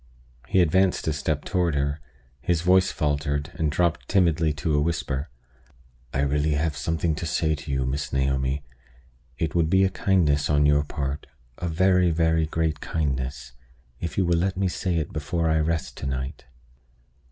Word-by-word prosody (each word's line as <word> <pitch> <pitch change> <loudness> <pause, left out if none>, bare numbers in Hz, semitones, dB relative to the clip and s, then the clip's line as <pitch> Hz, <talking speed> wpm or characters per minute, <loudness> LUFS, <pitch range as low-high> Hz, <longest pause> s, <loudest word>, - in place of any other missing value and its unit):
He 95 - +3
advanced 90 +2 +2
a 80 - +2
step 75 0 -2
toward 90 -5 0
her; 70 +1 -1 0.4
his 85 +2 0
voice 90 +1 +4
faltered, 75 +1 -1
and 80 -2 -1
dropped 85 +2 0
timidly 85 -5 +3
to 75 +2 -2
a 75 - +3
whisper. 75 -3 -2 0.8
"I 65 - 0
really 75 +2 +1
have 75 0 0
something 80 +3 -1
to 80 +2 -4
say 80 0 +1
to 75 0 -7
you, 65 -1 0
Miss 70 +3 -3
Naomi. 65 +1 0 0.7
It 80 - -1
would 85 -2 +2
be 95 +2 +4
a 95 - +2
kindness 80 -7 +2
on 75 -1 +3
your 75 0 +4
part 70 0 -4 0.3
a 90 - -2
very, 90 +1 +3
very 80 -1 +2
great 80 -1 -1
kindness 65 -4 -3 0.5
if 85 -3 -5
you 95 - +3
will 85 -1 +2
let 95 +1 0
me 95 0 +1
say 90 0 -1
it 80 -3 -2
before 80 +2 -1
I 80 0 +2
rest 80 +1 -1
to 70 - -4
night." 65 +2 -4
80 Hz, 175 wpm, -25 LUFS, 70-85 Hz, 0.8 s, voice